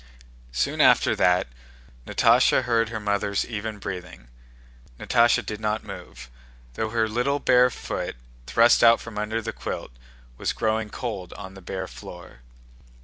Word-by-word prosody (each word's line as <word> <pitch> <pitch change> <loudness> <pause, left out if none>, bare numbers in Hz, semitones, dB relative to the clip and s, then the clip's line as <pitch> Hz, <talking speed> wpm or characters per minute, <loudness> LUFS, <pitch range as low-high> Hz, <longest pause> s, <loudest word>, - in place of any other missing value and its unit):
Soon 60 +1 0
after - - +5
that 90 +1 +3 0.6
Natásha - - +4
heard 115 -2 +1
her 110 -1 -4
mother's 100 -1 -1
even 110 -1 -5
breathing. 90 -11 -8 0.7
Natásha 120 0 +3
did 105 -1 -5
not 110 0 -1
move, 60 0 -10 0.5
though 110 - -2
her 110 0 +1
little 125 +6 0
bare 125 -3 +4
foot, - - -5 0.3
thrust 115 +1 +5
out 115 0 +7
from 115 -2 -7
under 110 +2 -2
the 110 0 -4
quilt, - - -6 0.5
was - - -1
growing 110 -1 -1
cold 105 -7 -5
on 95 -2 -9
the 95 - -12
bare 95 +1 -5
floor. 85 -11 -11
105 Hz, 145 wpm, -25 LUFS, 95-115 Hz, 0.7 s, out